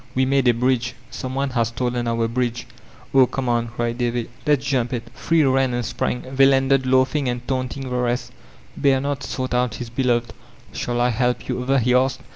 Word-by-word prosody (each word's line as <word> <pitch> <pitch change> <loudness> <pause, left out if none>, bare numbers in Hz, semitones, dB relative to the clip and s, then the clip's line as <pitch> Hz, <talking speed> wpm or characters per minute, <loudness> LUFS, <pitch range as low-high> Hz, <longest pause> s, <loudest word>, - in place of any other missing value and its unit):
"We 130 +1 +3
made 135 -1 +2
a 120 - +6
bridge. 125 0 0 0.2
Some 130 0 -5
one 135 0 -1
has 120 -3 +1
stolen 120 +1 -2
our 115 0 +1
bridge." 120 0 -2 0.5
"Oh, 130 -2 +6
come 135 0 -3
on," 120 -1 +1
cried 120 0 -3
Davy, 120 -1 -1 0.2
"let's 145 -2 +2
jump 130 -3 0
it." 120 -2 -4
Three 165 -1 +2
ran 130 -2 +2
and 120 -1 -2
sprang; 120 +2 -2
they 135 0 +6
landed 135 -1 +3
laughing 130 +1 +2
and 120 0 -4
taunting 130 0 -2
the 125 - -3
rest 125 0 -1 0.4
Bernard 140 0 +1
sought 130 -1 -4
out 125 -2 +1
his 120 -2 -7
beloved. 120 -2 0 0.4
"Shall 120 0 -2
I 120 +1 +3
help 125 +1 0
yon 125 - -2
over?" 135 +2 +1
he 125 0 +2
asked. 130 +1 +2
125 Hz, 200 wpm, -22 LUFS, 120-135 Hz, 0.5 s, a